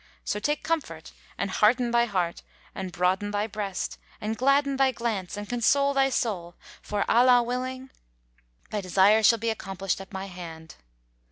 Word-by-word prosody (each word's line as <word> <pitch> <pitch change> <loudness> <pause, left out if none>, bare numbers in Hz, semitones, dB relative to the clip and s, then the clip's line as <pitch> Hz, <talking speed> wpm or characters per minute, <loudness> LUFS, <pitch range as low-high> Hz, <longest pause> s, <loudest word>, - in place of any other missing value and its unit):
So 210 - -1
take 295 +7 -1
comfort, 270 - -3 0.3
and 200 - -2
hearten 240 +3 +3
thy 235 0 +4
heart 180 -6 -2 0.3
and 190 -1 -5
broaden 185 +4 0
thy 205 0 -1
breast 205 -3 -4 0.2
and 215 +1 -3
gladden 275 +2 +2
thy 265 -1 +4
glance 225 -6 -3
and 205 0 -6
console 280 +4 +2
thy 270 -1 +3
soul 185 -9 -2 0.3
for, 205 -1 -2
Allah 245 0 +5
willing, 255 +2 -4 0.8
thy 210 - -2
desire 195 +4 +4
shall 230 +2 +5
be 225 +1 -1
accomplished 195 -3 -3
at 195 - -12
my 190 0 -5
hand." 170 -4 -9
215 Hz, 160 wpm, -26 LUFS, 190-250 Hz, 0.8 s, Allah